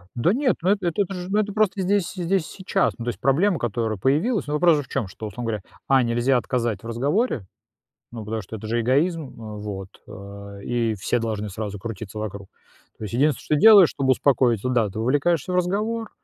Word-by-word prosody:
Да 125 Hz, +9 st, +2 dB
нет, 265 Hz, -1 st, +1 dB
ну 185 Hz, -, +2 dB
эт 200 Hz, -1 st, +1 dB
эт 175 Hz, +1 st, -2 dB
это 195 Hz, -1 st, 0 dB
же, 180 Hz, -1 st, -6 dB
ну, 205 Hz, -, +2 dB
это 210 Hz, -1 st, 0 dB
просто 210 Hz, -2 st, +1 dB
здесь 190 Hz, -1 st, +1 dB
здесь 185 Hz, 0 st, 0 dB
и -, -, -12 dB
сейчас. 190 Hz, -, +1 dB
Ну 115 Hz, -, -5 dB
то -, -, -1 dB
есть 120 Hz, -, -4 dB
проблема, 160 Hz, +7 st, +2 dB
которая 115 Hz, -1 st, -2 dB
появилась, 160 Hz, -, +1 dB
ну, 150 Hz, -, -3 dB
вопрос 165 Hz, +1 st, +4 dB
же -, -, -2 dB
в 130 Hz, -, -16 dB
чём, 120 Hz, -8 st, -2 dB
что, 110 Hz, +3 st, -8 dB
условно 105 Hz, +4 st, -6 dB
говоря, 105 Hz, -3 st, -4 dB, 0.3 s
А- 135 Hz, -1 st, +5 dB
нельзя 120 Hz, +2 st, +2 dB
отказать 120 Hz, -3 st, -1 dB
в -, -, -11 dB
разговоре, 135 Hz, -, 0 dB, 0.7 s
ну 115 Hz, -3 st, -7 dB
потому 110 Hz, +1 st, -3 dB
что 105 Hz, +4 st, -8 dB
это 110 Hz, -, -8 dB
же 120 Hz, +1 st, 0 dB
эгоизм, 150 Hz, +8 st, +2 dB
э, 110 Hz, -4 st, -9 dB
вот, 95 Hz, -2 st, -6 dB, 0.2 s
э, 100 Hz, 0 st, -10 dB
и 115 Hz, -2 st, 0 dB
все 105 Hz, +4 st, -1 dB
должны 110 Hz, -2 st, -3 dB
сразу 105 Hz, +1 st, -5 dB
крутиться 110 Hz, -1 st, -7 dB
вокруг. 100 Hz, -2 st, -6 dB, 0.5 s
То -, -, -6 dB
есть 105 Hz, -, -6 dB
единственное, 140 Hz, +2 st, +1 dB
что 150 Hz, -, +1 dB
делаешь, 200 Hz, +1 st, +8 dB
чтобы 135 Hz, -1 st, -1 dB
успокоить, 125 Hz, -5 st, +2 dB
да, 125 Hz, -4 st, +1 dB
ты 100 Hz, -, -7 dB
вовлекаешься 145 Hz, +7 st, +1 dB
в -, -, +1 dB
разговор, 210 Hz, +5 st, -1 dB
125 Hz, 220 wpm, -23 LUFS, 110-180 Hz, 0.7 s, делаешь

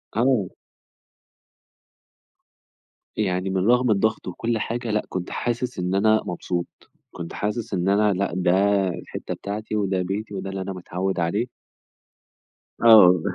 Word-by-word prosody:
آه. 115 Hz, -5 st, +2 dB, 2.7 s
يعني 95 Hz, -2 st, 0 dB
من 95 Hz, +1 st, 0 dB
رغم 125 Hz, 0 st, +4 dB
الضغط 110 Hz, +2 st, 0 dB
وكُلّ 115 Hz, +5 st, -2 dB
حاجة 115 Hz, +1 st, -3 dB
لأ، 105 Hz, 0 st, 0 dB
كنت 90 Hz, -1 st, -4 dB
حاسِس 120 Hz, -1 st, -3 dB
إن 90 Hz, +1 st, -1 dB
أنا 110 Hz, +2 st, +4 dB
مبسوط، 90 Hz, 0 st, -3 dB, 0.4 s
كنت 85 Hz, -1 st, -7 dB
حاسِس 105 Hz, +1 st, -3 dB
إن 90 Hz, 0 st, 0 dB
أنا 105 Hz, +1 st, +3 dB
لأ، 95 Hz, -1 st, -1 dB
ده 90 Hz, -1 st, +2 dB, 0.4 s
الحِتّة 85 Hz, -, -6 dB
بتاعتي، 105 Hz, +2 st, -5 dB
وده 95 Hz, -3 st, 0 dB
بيتي 100 Hz, +4 st, -4 dB
وده 95 Hz, 0 st, -4 dB
اللي 95 Hz, 0 st, -4 dB
أنا 95 Hz, +1 st, -4 dB
متعوِّد 95 Hz, +1 st, -3 dB
عليه. 85 Hz, +7 st, 0 dB, 1.4 s
آه، 95 Hz, -7 st, +8 dB
100 Hz, 130 wpm, -23 LUFS, 90-110 Hz, 2.7 s, آه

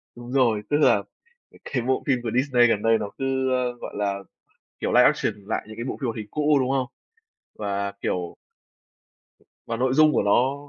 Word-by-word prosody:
Đúng 120 Hz, +1 st, -10 dB
rồi, 120 Hz, -6 st, +2 dB
tức 145 Hz, -, +2 dB
là 150 Hz, -, +4 dB, 0.6 s
cái 125 Hz, -, -2 dB
bộ 130 Hz, +1 st, 0 dB
phim 130 Hz, -3 st, +2 dB
của 115 Hz, -, -2 dB
Disney 125 Hz, -2 st, +4 dB
gần 105 Hz, -3 st, +1 dB
đây 115 Hz, 0 st, +3 dB
nó 100 Hz, -, -4 dB
cứ, 135 Hz, -1 st, 0 dB
ơ, 125 Hz, -1 st, +1 dB
gọi -, -, -7 dB
là, 100 Hz, -1 st, -1 dB, 0.6 s
kiểu, -, -, -1 dB
live -, -, +7 dB
action -, -, +2 dB
lại -, -, -2 dB
những 110 Hz, -, -10 dB
cái 115 Hz, -, -5 dB
bộ -, -, -4 dB
phim -, -, -4 dB
hoạt 115 Hz, -, -3 dB
hình 105 Hz, -1 st, -5 dB
cũ, 150 Hz, -1 st, +2 dB
đúng 130 Hz, 0 st, 0 dB
không? 135 Hz, -2 st, +1 dB, 0.7 s
Và, 100 Hz, -1 st, -3 dB
kiểu 90 Hz, -1 st, -3 dB, 1.3 s
và 115 Hz, 0 st, -3 dB
nội 130 Hz, +1 st, +1 dB
dung 155 Hz, +1 st, +5 dB
của -, -, +2 dB
nó 125 Hz, +6 st, +3 dB
125 Hz, 200 wpm, -24 LUFS, 110-130 Hz, 1.3 s, live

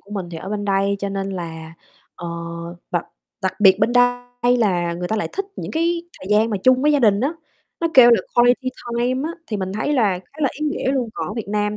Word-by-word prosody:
của 200 Hz, -, -21 dB
mình 190 Hz, -4 st, -4 dB
thì 165 Hz, -, -6 dB
ở 190 Hz, -, -7 dB
bên 205 Hz, -1 st, -3 dB
đây 200 Hz, 0 st, +1 dB
cho 200 Hz, -, -3 dB
nên 195 Hz, 0 st, -3 dB
là, 165 Hz, -3 st, -6 dB, 0.4 s
ờ 175 Hz, -, -8 dB, 0.6 s
đặc -, -, -1 dB, 0.4 s
đặc -, -, 0 dB
biệt 190 Hz, -1 st, +6 dB
bên 225 Hz, +3 st, +2 dB
đây 245 Hz, 0 st, +2 dB
là 175 Hz, -7 st, +1 dB
người 180 Hz, +1 st, -4 dB
ta 220 Hz, -, 0 dB
lại 210 Hz, -, -2 dB
thích 395 Hz, -, -2 dB
những -, -, -5 dB
cái 335 Hz, +1 st, 0 dB, 0.2 s
thời 185 Hz, -, -9 dB
gian 215 Hz, +2 st, +3 dB
mà 205 Hz, -, 0 dB
chung 255 Hz, +1 st, +5 dB
với 300 Hz, 0 st, +4 dB
gia 290 Hz, -, +3 dB
đình 210 Hz, -4 st, +3 dB
á, 280 Hz, +5 st, 0 dB, 0.5 s
nó 335 Hz, -, +1 dB
kêu 240 Hz, -2 st, +9 dB
là 230 Hz, -5 st, +5 dB
quality 245 Hz, +2 st, +4 dB, 0.3 s
time 255 Hz, +5 st, 0 dB
á, -, -, -4 dB, 0.2 s
thì 215 Hz, -, -3 dB
mình 190 Hz, -1 st, -3 dB
thấy 220 Hz, +8 st, -1 dB
là 210 Hz, -9 st, +2 dB
khá 185 Hz, -, -20 dB
là 275 Hz, -, +4 dB
ý 305 Hz, -, 0 dB
nghĩa 280 Hz, -2 st, -1 dB
luôn. 255 Hz, -4 st, -1 dB
Còn -, -, -3 dB
ở 210 Hz, -, -5 dB
Việt 225 Hz, -4 st, -5 dB
Nam 210 Hz, 0 st, -1 dB
215 Hz, 250 wpm, -21 LUFS, 195-250 Hz, 0.6 s, kêu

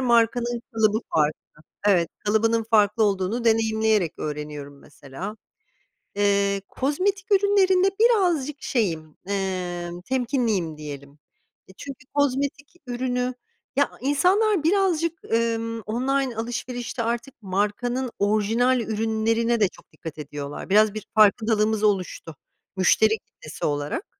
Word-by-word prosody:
markanın 235 Hz, -1 st, +2 dB
kalıbı 220 Hz, -1 st, +2 dB, 0.2 s
farklı. 155 Hz, -1 st, +2 dB, 0.5 s
Evet, 175 Hz, -5 st, +4 dB, 0.2 s
kalıbının 225 Hz, +2 st, +2 dB
farklı 210 Hz, 0 st, +4 dB
olduğunu 200 Hz, +4 st, 0 dB
deneyimleyerek 220 Hz, -5 st, +2 dB
öğreniyorum 150 Hz, -2 st, -6 dB
mesela. 145 Hz, +10 st, -9 dB, 0.8 s
Eee, 200 Hz, -1 st, +2 dB
kozmetik 380 Hz, +9 st, -1 dB
ürünlerinde 390 Hz, -1 st, +4 dB
birazcık 350 Hz, -, +2 dB
şeyim, 165 Hz, -, -2 dB
emm, 180 Hz, -3 st, -3 dB
temkinliyim, 230 Hz, -, -1 dB
diyelim. 145 Hz, -1 st, -9 dB, 0.5 s
E, -, -, -14 dB
çünkü 275 Hz, -2 st, -9 dB
kozmetik 285 Hz, 0 st, -1 dB
ürünü 250 Hz, 0 st, -1 dB, 0.4 s
Ya 285 Hz, +1 st, +2 dB
insanlar 365 Hz, -, +2 dB
birazcık, 335 Hz, -2 st, +1 dB
ımm, 230 Hz, 0 st, 0 dB
online 255 Hz, +3 st, -1 dB
alışverişte 240 Hz, +1 st, -4 dB
artık 235 Hz, +3 st, -3 dB
markanın 210 Hz, +6 st, -1 dB
orijinal 220 Hz, +5 st, +2 dB
ürünlerine 225 Hz, +1 st, 0 dB
de 205 Hz, -, +4 dB
çok -, -, -18 dB
dikkat 160 Hz, -3 st, -9 dB
ediyorlar. 145 Hz, +1 st, -7 dB
Biraz 210 Hz, +1 st, +5 dB
bir 215 Hz, -1 st, -6 dB
farkındalığımız 215 Hz, 0 st, +3 dB
oluştu 185 Hz, -6 st, -1 dB, 0.4 s
müşteri 215 Hz, +4 st, +4 dB
kitlesi 155 Hz, -5 st, -9 dB
olarak. 145 Hz, -, -3 dB
225 Hz, 105 wpm, -24 LUFS, 195-255 Hz, 0.8 s, Biraz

